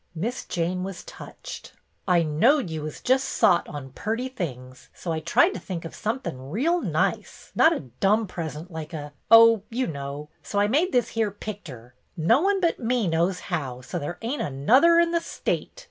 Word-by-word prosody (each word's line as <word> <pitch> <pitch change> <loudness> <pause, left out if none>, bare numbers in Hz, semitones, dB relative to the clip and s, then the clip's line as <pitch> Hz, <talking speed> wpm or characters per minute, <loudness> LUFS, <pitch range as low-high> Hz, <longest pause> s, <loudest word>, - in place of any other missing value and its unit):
Miss 225 +10 -3
Jane 175 +2 -2
was 190 -2 -6
touched. - - -10 0.2
" - - -44
I 175 -2 +4
knowed 180 - +2
you 160 -1 -4
was 155 0 -7
just 260 +1 +3
sot 175 -3 +3
on 140 -3 -7
purty 225 - -3
things, 130 - -7
so 170 - -5
I 160 - -1
tried 160 +2 +3
to - - -6
think 170 -1 -6
of 165 - -7
somethin' 215 - -4
reel 320 - +1
nice, - - -2
not 320 - +5
a - - -1
dumb 195 - +1
present 170 -2 -6
like 160 0 -7
a 150 -2 -6
— - - -45
oh, 230 -1 +8
you 255 +3 -1
know 140 - -6
— - - -40
so 205 - -5
I 205 0 +4
made 310 - +2
this 240 -2 +2
here 225 -2 0
picter. 175 - -9 0.2
No 200 - +4
one 395 +1 +2
but 340 -3 +1
me 240 -3 0
knows 170 +3 +1
how, 140 -9 -4
so 175 +8 -5
there 170 +4 -5
ain't 255 +6 -2
another 255 - +4
in 340 0 +3
the 335 -1 +1
state. - - -3
185 Hz, 200 wpm, -25 LUFS, 155-245 Hz, 0.2 s, oh